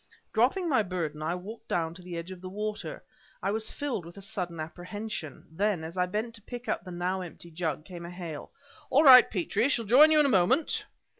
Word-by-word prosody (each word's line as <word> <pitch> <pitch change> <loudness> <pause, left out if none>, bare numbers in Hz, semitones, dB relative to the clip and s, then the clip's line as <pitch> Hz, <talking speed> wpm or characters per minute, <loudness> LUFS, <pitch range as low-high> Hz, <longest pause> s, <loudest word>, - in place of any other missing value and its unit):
Dropping 265 - +2
my 265 -8 +3
burden, 170 -6 -3
I 160 +3 -1
walked 205 +6 -9
down 165 -1 -1
to 180 - -12
the 180 -1 -7
edge 170 +2 -6
of 185 -1 -9
the 185 - -6
water. 210 +2 -5 0.4
I - - +1
was 220 +1 -2
filled 275 -10 -3
with 170 +3 -12
a - - -8
sudden 180 -4 -4
apprehension. 180 0 -6
Then, 190 0 0
as 165 +2 -7
I 180 -1 +1
bent 215 +5 -3
to 225 - -10
pick 245 +3 -8
up - - -1
the 185 - -10
now 180 +2 -2
empty 170 -1 -10
jug, 155 -2 -3
came 170 -1 -8
a - - -7
hail: 175 -4 -7 0.4
"All 285 +4 +5
right, 255 -4 +10
Petrie! 210 +5 0
Shall 235 -5 0
join 265 +9 +8
you 310 -1 +5
in 300 - +5
a 260 -8 +5
moment!" 260 - +2
185 Hz, 225 wpm, -29 LUFS, 170-225 Hz, 0.4 s, right